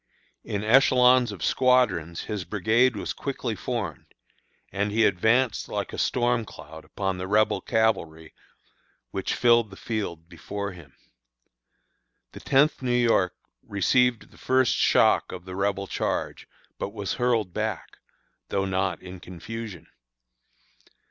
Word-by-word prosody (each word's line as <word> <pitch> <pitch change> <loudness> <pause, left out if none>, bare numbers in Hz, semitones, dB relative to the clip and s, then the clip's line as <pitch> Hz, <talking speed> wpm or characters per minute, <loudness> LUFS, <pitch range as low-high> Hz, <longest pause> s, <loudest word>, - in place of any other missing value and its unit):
In 100 0 -3
echelons 125 0 +5
of 95 -5 -8
squadrons 110 -11 +2
his 105 -4 -4
brigade 110 +7 +2
was - - -4
quickly 130 -4 -4
formed, 115 0 -4 0.6
and 100 +2 -1
he 110 +1 +3
advanced 110 +5 +2
like - - -4
a - - -5
storm 120 -1 +1
cloud 80 -6 -12
upon 95 -2 -3
the 90 - -4
Rebel 105 0 +2
cavalry 85 -8 -1 0.8
which 95 - -2
filled 120 -2 +4
the 95 - -12
field 85 -8 -4
before 100 +2 -6
him. 85 -7 -14 1.4
The - - -10
Tenth 145 +3 +2
New 130 - -2
York 115 -7 +2 0.3
received 120 +4 +1
the - - -19
first 130 -2 +2
shock - - +3
of 90 -1 -8
the 90 -1 -7
Rebel 100 0 -1
charge, - - -3 0.3
but 100 - -4
was 100 -3 -3
hurled 115 -7 0
back, 110 -3 -4 0.5
though 95 0 0
not 95 -2 -1
in 90 0 -9
confusion. 90 0 -8
105 Hz, 130 wpm, -25 LUFS, 95-120 Hz, 1.4 s, echelons